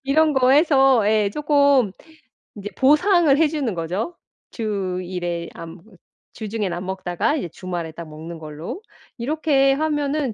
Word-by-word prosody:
이런 305 +3 +3
거 260 -2 +3
해서 270 -7 +4
예 210 -2 +2
쪼끔 280 -6 +3 0.6
이제 205 0 -7
보상을 305 +2 +4
해주는 295 -7 0
거죠. 180 - -3 0.4
주 195 -5 -3
1 180 0 -6
회 170 -1 -3
안 165 +1 -9 0.5
주중엔 215 -4 -3
안 180 +2 -5
먹다가 190 - -1
이제 180 - -4
주말에 175 -2 -5
딱 170 0 -9
먹는 160 +2 -9
걸로 155 - -7 0.4
이렇게 275 +1 +2
하면은 295 -3 -1
225 Hz, 255 characters per minute, -22 LUFS, 180-290 Hz, 0.6 s, 해서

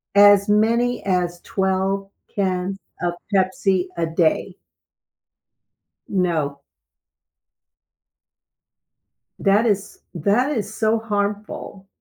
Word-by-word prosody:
As 205 0 +7
many 235 +3 +2
as 175 -2 0
12 190 +1 -1 0.3
cans 190 -1 -1 0.2
of 175 0 0 0.2
Pepsi 190 -1 +2
a 165 - +1
day. 165 +3 +1 1.5
No. 160 -7 -1 2.8
That 200 +3 +3
is 205 -2 -1
that 205 - +2
is 215 -4 -3
so 220 0 +2
harmful. 205 -2 -4
195 Hz, 80 wpm, -22 LUFS, 180-205 Hz, 2.8 s, As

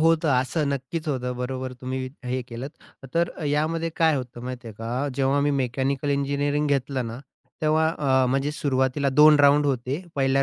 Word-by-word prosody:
होतं 165 0 +3
असं, 130 +4 0
नक्कीच 140 +4 -3
होतं, 125 -3 -2
बरोबर 130 +1 -4
तुम्ही 130 +1 -3 0.3
हे 130 +1 -1
केलंत. 125 +4 -6 0.3
त - - -6
तर 170 +1 +2 0.2
यामध्ये 160 +3 0
काय 160 -2 +4
होतं 125 -2 -6
माहिती 125 -1 -6
आहे 110 - -10
का, 115 0 -5 0.3
जेव्हा 135 +1 +2
मी 145 - +2
मेकॅनिकल 135 +2 -1
इंजिनिअरिंग 145 +1 0
घेतलं 135 -3 0
ना, 115 +2 -6 0.4
तेव्हा 155 +1 +3
अ, 130 -3 +3
म्हणजे 135 +3 0
सुरुवातीला 135 -1 0
2 150 +3 +7
राउंड 145 +1 +5
होते. 135 +5 -1
1ल्या 135 0 +2
135 Hz, 175 wpm, -25 LUFS, 130-150 Hz, 0.4 s, 2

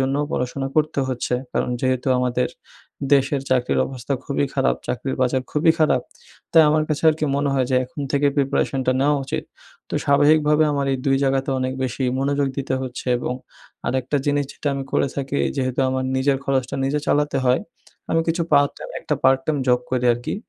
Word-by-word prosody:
জন্যও 135 +2 +1
পড়াশোনা 130 +2 -2
করতে 155 -1 +1
হচ্ছে। 125 -1 -1 0.2
কারণ - - 0
যেহেতু 130 0 0
আমাদের 125 0 0 0.7
দেশের 135 0 +2
চাকরির 125 -1 +2
অবস্থা 130 0 -5
খুবই 140 0 0
খারাপ, 135 -1 +2
চাকরির 130 +2 -3
বাজার 130 +1 +1
খুবই 160 +2 +3
খারাপ 155 -2 +3 0.5
তাই 165 -1 +8
আমার 155 +1 +3
কাছে 155 0 -2
আরকি 155 0 -2
মনে 140 0 0
হয় 130 -2 +1
যে 130 - +2
এখন 130 +4 -9
থেকেই 140 0 +2
প্রিপারেশনটা 135 -2 +1
নেওয়া 145 +2 +3
উচিত। - - -3 0.4
তো - - -5
স্বাভাবিকভাবে 150 +2 +4
আমার 140 -1 -1
এই 135 - -1
২ 135 - +4
জায়গাতে 135 +1 0
অনেক 130 0 -1
বেশি 130 +1 -2
মনোযোগ 140 0 +1
দিতে 130 -1 -1
হচ্ছে 130 0 -6
এবং 125 - -3 0.5
আরেকটা 130 +2 0
জিনিস 145 0 +2
যেটা 145 - -3
আমি 135 0 -4
করে - - +2
থাকি 135 - -2 0.2
যেহেতু 130 0 -1
আমার 130 0 -1
নিজের 135 +1 +2
খরচটা 130 -2 -1
নিজে 145 +2 0
চালাতে 145 0 +1
হয়, 125 0 +3 0.5
আমি 165 - +3
কিছু 170 +1 +1
পার্ট 145 0 +5
টাইম, - - -8
একটা 150 - -1
পার্ট 135 0 +4
টাইম 155 -2 +1
জব 125 0 +4
করি 125 -1 0
আরকি। 120 +1 -4
135 Hz, 185 wpm, -22 LUFS, 130-145 Hz, 0.7 s, তাই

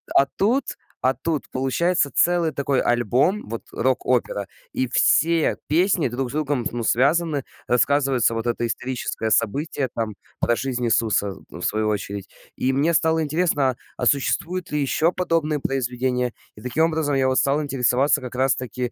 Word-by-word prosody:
а 140 - +6
тут, 240 +7 0 0.2
а, 130 +1 +2
тут 150 +3 -3
получается 140 +4 +1
целый 175 -2 +3
такой 140 -1 0
альбом, 120 - +1
вот, 115 +1 -5
рок-опера, 125 -6 0 0.3
и 130 - 0
все 165 +5 +3
песни 175 +1 +2
друг 125 +1 -3
с - - -8
другом, 145 -5 -1
ну, 120 -1 -4
связаны. 145 +4 +2 0.2
Рассказывается 130 -1 +2
вот 115 +1 -3
это 120 0 -1
историческое 120 -2 -3
событие, 135 +4 0
там, 110 -3 -3 0.3
про 120 - +2
жизнь 125 -2 -2
Иисуса, 105 -3 +1
ну, - - -10
в - - -2
свою 110 0 0
очередь. 100 -1 -4 0.3
И 130 +1 0
мне 155 +5 +2
стало 160 0 +2
интересно: 145 -5 +1 0.2
а 125 - -2
существуют 145 +8 0
ли 150 -1 0
ещё 160 +5 +2
подобные 165 -4 0
произведения? 125 -2 -1 0.2
И 105 - -13
таким 150 +7 +1
образом 155 -3 0
я 135 -1 +2
вот 130 - +1
стал 140 +2 +2
интересоваться 135 0 +2
как 125 0 -7
раз-таки 125 -2 -1
135 Hz, 160 wpm, -22 LUFS, 120-155 Hz, 0.3 s, а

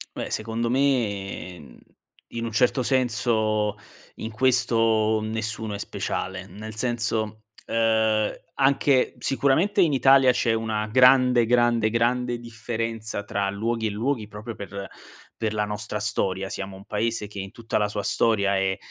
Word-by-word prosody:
Beh - - -4
secondo 115 +2 -2
me, 105 -9 -1
mhmm, 65 -5 -15 0.6
in 115 0 -2
un 115 - -4
certo 125 +3 +2
senso 110 -4 +1 0.4
in 110 - -5
questo 115 -3 +2
nessuno 110 -1 -3
è 100 - -5
speciale, 95 -1 -4
nel 110 +2 -9
senso, 110 -2 -2 0.2
ehm, 110 -1 +2 0.2
anche 135 -1 +2
sicuramente 165 +10 +2
in 165 -4 +4
Italia 135 -1 +5
c'è 120 -2 +1
una 110 -1 -1
grande, 125 0 +5
grande, 120 -2 +3
grande 120 +2 0
differenza 115 -2 -4
tra 100 -1 -2
luoghi 110 +2 -1
e - - -1
luoghi, 110 +2 -2
proprio 105 +2 -8
per 100 -1 -7 0.5
per 110 -2 -2
la 105 - +1
nostra 105 0 -3
storia. 95 -2 -1
Siamo 95 -1 -6
un 100 - -14
paese 110 +1 -2
che 100 -1 -9
in 95 0 -6
tutta 115 -2 -2
la 105 - +1
sua 105 0 -3
storia 100 -2 +2
è 95 -1 0
110 Hz, 145 wpm, -25 LUFS, 105-120 Hz, 0.6 s, Italia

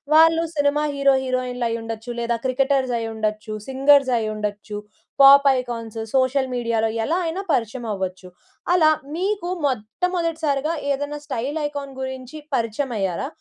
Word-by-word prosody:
వాళ్ళు 325 +1 +6
cinema 290 +1 +2
hero, 275 -1 +4
హీరోయిన్లు 250 -1 -1
అయ్యుండొచ్చు 225 0 -5
లేదా, 235 0 0
క్రికెటర్స్ 265 -1 +1
అయ్యుండొచ్చు, 215 -1 -3 0.2
సింగర్స్ 275 0 +4
అయ్యుండొచ్చు, 210 -1 -4 0.4
పాప్ 280 +1 +9
ఐకాన్స్, 230 -3 -5 0.2
సోషల్ 260 +1 +2
మీడియాలో 230 -2 0
ఎలా 315 +9 0
అయినా, 330 +4 -2
పరిచయం 240 -3 -1
అవ్వచ్చు. 185 -1 -5 0.5
అలా, 315 -3 +5 0.2
మీకు 380 0 -1 0.2
మొట్టమొదటిసారిగా 310 - -1 0.2
ఏదైనా, 290 +2 -2
స్టైల్ 275 +2 -3
ఐకాన్ 285 -1 -6
గురించి 260 +2 -6 0.2
పరిచయం 240 +2 -1
అయ్యారా? 190 +6 -1
260 Hz, 120 wpm, -22 LUFS, 225-290 Hz, 0.5 s, పాప్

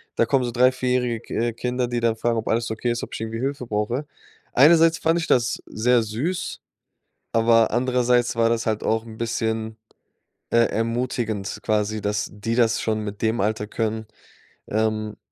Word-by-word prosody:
Da - - +3
kommen 125 +2 +1
so 120 - -3
3-, 125 +2 +4
4- 130 0 -3
jährige, 125 -2 0
k - - -10 0.2
äh, - - -6
Kinder, 125 +2 -2
die 120 0 -1
dann 115 -1 +2
fragen, 115 +1 0
ob 110 - -3
alles 115 0 0
okay 115 +2 -1
ist, 120 - -3
ob - - -7
ich - - -6
irgendwie 115 0 -4
Hilfe 135 -2 -3
brauche. 110 +6 -1 0.5
Einerseits 165 +4 +6
fand 165 +1 +2
ich 165 - -3
das 120 -4 +2
sehr 120 +2 +2
süß, 145 - -3 0.7
aber 115 0 +4
andererseits 125 0 +2
war 115 0 +3
das 115 -1 0
halt 110 -1 0
auch 110 0 +1
'n 110 -1 -11
bisschen, 110 -1 -2 0.7
äh, - - +1
ermutigend 115 -3 -2
quasi, 110 0 0
dass 105 0 -1
die 105 +3 -3
das 115 -2 +3
schon 110 -1 0
mit 105 -1 -6
dem 110 +1 +1
Alter 105 +1 0
können, 110 0 -2 0.6
ähm, 110 0 -1
115 Hz, 185 wpm, -23 LUFS, 110-125 Hz, 0.7 s, Einerseits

